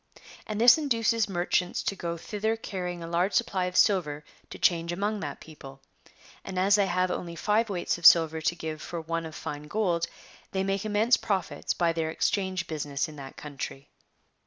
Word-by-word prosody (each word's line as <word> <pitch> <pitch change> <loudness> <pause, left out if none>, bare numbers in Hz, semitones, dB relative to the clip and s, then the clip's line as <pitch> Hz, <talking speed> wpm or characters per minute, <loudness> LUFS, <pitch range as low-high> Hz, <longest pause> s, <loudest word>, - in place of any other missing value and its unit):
And 215 -1 -3
this 245 +6 +8
induces 230 -6 +1
merchants 180 0 0
to 195 - -1
go 170 -2 -4
thither 215 +6 -2
carrying 180 -5 -5
a - - -6
large 175 +4 0
supply 185 -2 +1
of 180 0 -3
silver 150 -7 +2 0.3
to - - -8
change 170 -1 +2
among 205 +4 -1
that 145 -6 -5
people. 135 -4 -12 0.6
And 190 -1 -6
as 190 +2 +3
they 200 -1 +4
have 185 0 +1
only 170 -1 -4
five 215 +6 +1
weights 175 -2 -1
of 170 - -8
silver 160 -1 +6
to 155 +3 0
give 155 -2 -5
for 170 - -5
one 165 0 -3
of 155 - -10
fine 150 0 -6
gold, 175 -2 0 0.5
they 190 0 0
make 195 +1 -1
immense 215 +3 +3
profits 195 -4 -2
by 170 -1 +2
their 160 -1 -1
exchange 185 +2 -1
business 150 -1 -2
in 155 - -11
that 135 -1 -10
country." 140 -1 -7
175 Hz, 185 wpm, -28 LUFS, 160-200 Hz, 0.6 s, this